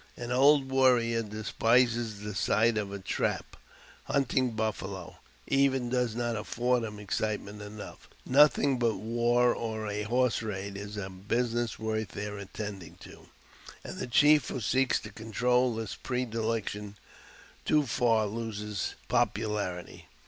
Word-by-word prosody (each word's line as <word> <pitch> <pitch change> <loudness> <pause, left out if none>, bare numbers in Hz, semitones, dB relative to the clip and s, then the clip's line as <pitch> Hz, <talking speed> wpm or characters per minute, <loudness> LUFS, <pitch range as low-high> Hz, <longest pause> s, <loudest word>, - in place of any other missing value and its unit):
An 120 0 -5
old 135 +1 +4
warrior 120 -3 +3
despises 115 +1 +1
the 105 0 -5
sight 110 +4 +2
of 105 -2 -2
a 100 - -4
trap; 95 - -2 0.5
hunting 130 -3 +1
buffalo, 100 -4 -4 0.3
even, 135 -3 +2
does 125 -3 0
not 120 -1 -1
afford 120 +3 0
him 105 -2 -5
excitement 105 0 -3
enough. 105 0 -10 0.2
Nothing 140 -1 +4
but 115 -3 +2
war 120 +4 +2
or 110 -2 -4
a 105 0 -2
horse 120 +3 +1
raid 100 -2 -4
is 100 +1 -7
a 95 -2 -3
business 115 +5 -1
worth 110 -1 -3
their 105 0 -5
attending 100 -3 -7
to, - - -13 0.6
and - - -7
the - - -3
chief 150 +4 +5
who - - -3
seeks 130 +4 +2
to - - -9
control 125 +2 +1
this 110 -2 -4
pre 125 0 -2
dilection 110 -3 -3 0.7
too 150 -1 +3
far 115 -3 +2
loses 105 -2 -4
popularity. 100 -5 -1
115 Hz, 135 wpm, -29 LUFS, 105-125 Hz, 0.7 s, chief